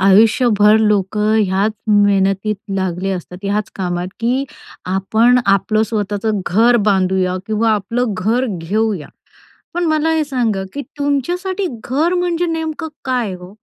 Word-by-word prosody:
आयुष्यभर 210 +2 +5
लोकं 210 0 +1
ह्याच 195 +2 +1 0.2
मेहनतीत 205 0 +2 0.2
लागले 190 0 -2
असतात, 180 -1 -6
ह्याच 205 +1 -1
कामात 180 -1 -2
की 250 +4 0 0.4
आपण 220 +6 +3
आपलं 200 +2 +2
स्वतःचं 210 0 -2
घर 230 +6 +4
बांधूया 185 -1 +1
किंवा 220 +1 +1
आपलं 220 +2 -1
घर 225 +8 0
घेऊया, 195 -1 -2 0.7
पण 350 0 0
मला 310 0 +1
हे 315 -1 +1
सांगा 240 -8 -1
की 285 - -3 0.2
तुमच्यासाठी 355 +8 -1 0.2
घर 310 +8 +1
म्हणजे 355 -1 0
नेमकं 320 0 -3 0.2
काय 245 -7 -1
हो? 180 +2 -12
215 Hz, 125 wpm, -17 LUFS, 195-255 Hz, 0.7 s, आयुष्यभर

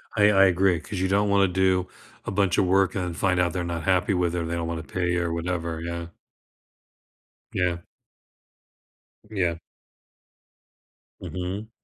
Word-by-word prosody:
I 105 -2 +5
I 95 -1 +6
agree 95 -1 +3
'cause 100 +3 -6
you 95 - +1
don't 100 +2 +2
wanna 100 -1 +4
do 95 0 +1 0.4
a - - -3
bunch 100 -2 +1
of - - +4
work 95 0 +2
and 90 -3 -2
find 95 +1 +1
out 90 -2 +1
they're 90 - -2
not 85 -1 -4
happy 95 +1 +2
with 90 -2 0
it - - 0
or - - -3
they 85 +1 -3
don't 85 -1 -2
wanna 85 -1 -4
pay 90 -1 -1
or 85 -1 0
whatever, 85 -1 -3
yeah. 85 0 -4 1.5
Yeah. 90 -2 +1 1.5
Yeah. 90 -6 0 1.6
Mhm. 95 +4 -5
90 Hz, 155 wpm, -25 LUFS, 85-95 Hz, 1.6 s, I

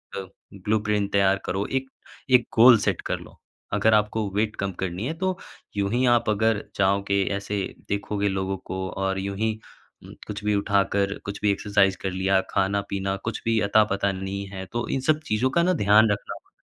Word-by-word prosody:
अ, 100 - -3 0.3
blue 105 +3 0
print 105 -1 0
तैयार 100 -1 +3
करो, 95 +2 -1
एक-एक 130 -1 -1
गोल 120 +1 +8
सेट - - -1
कर - - -2
लो। - - -15 0.3
अगर 110 0 +3
आपको 105 0 +1
वेट 110 +1 0
कम 100 -1 -2
करनी 95 +4 -3
है, 155 - -2
तो 185 +2 -2 0.4
यूँही 110 +6 +1
आप 120 -2 0
अगर 110 0 +1
चाहोगे, 100 0 +2
ऐसे 100 0 -3 0.3
देखोगे 100 0 -1
लोगों 95 0 -2
को 95 0 -3
और 95 0 -2
यूँ 100 0 -4
ही 110 +1 +1 0.5
उम, - - -12
कुछ 105 0 -6
भी 105 0 +1
उठा 100 0 +2
कर, 100 0 0
कुछ 100 0 -6
भी 105 -1 +3
एक्सरसाइज़ 100 -1 +2
कर 95 - -2
लिया, 95 +1 +2
खाना-पीना 100 0 -1
कुछ 115 -1 -3
भी 115 -1 +2
अता-पता 100 -2 +3
नहीं 95 +1 -4
है 95 -1 -7
तो 120 0 -2
इन 135 - 0
सब 155 0 +4
चीज़ों 110 +5 +1
का 170 - +5
ना 185 +1 +3
ध्यान 110 - +5
रखना 100 - -3
होगा। - - -17
100 Hz, 190 wpm, -25 LUFS, 95-110 Hz, 0.5 s, गोल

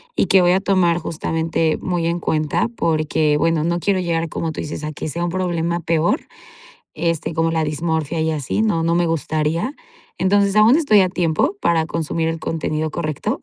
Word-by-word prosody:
y - - +1
que 190 - +5
voy 175 0 +4
a 190 - +2
tomar 180 -4 +2
justamente 160 0 -1
muy 175 -2 -1
en 170 0 -1
cuenta 155 +7 0
porque, 155 -2 +1
bueno, 160 0 +1
no 170 +1 0
quiero 195 -2 +1
llegar, 165 -2 -1
como 160 +1 -3
tú - - -5
dices, 150 0 -5
a 155 - -5
que 155 - -5
sea 170 +4 -2
un - - -1
problema 170 -1 -1
peor, 165 - +1 0.7
este, 165 -1 -2
como 165 0 +1
la 160 -1 0
dismorfia 160 +1 -2
y 160 - +1
así, 155 +7 -1
no 200 -7 +1
no 165 +1 +1
me 175 - +2
gustaría. 165 - -1 0.4
Entonces 200 +2 +2
aún 220 +5 +6
estoy 285 -11 +4
a 185 - 0
tiempo 175 - 0
para 165 -2 +2
consumir 165 0 -2
el 165 0 -2
contenido 155 -1 -2
correcto. 155 -2 -3
165 Hz, 190 wpm, -20 LUFS, 160-175 Hz, 0.7 s, aún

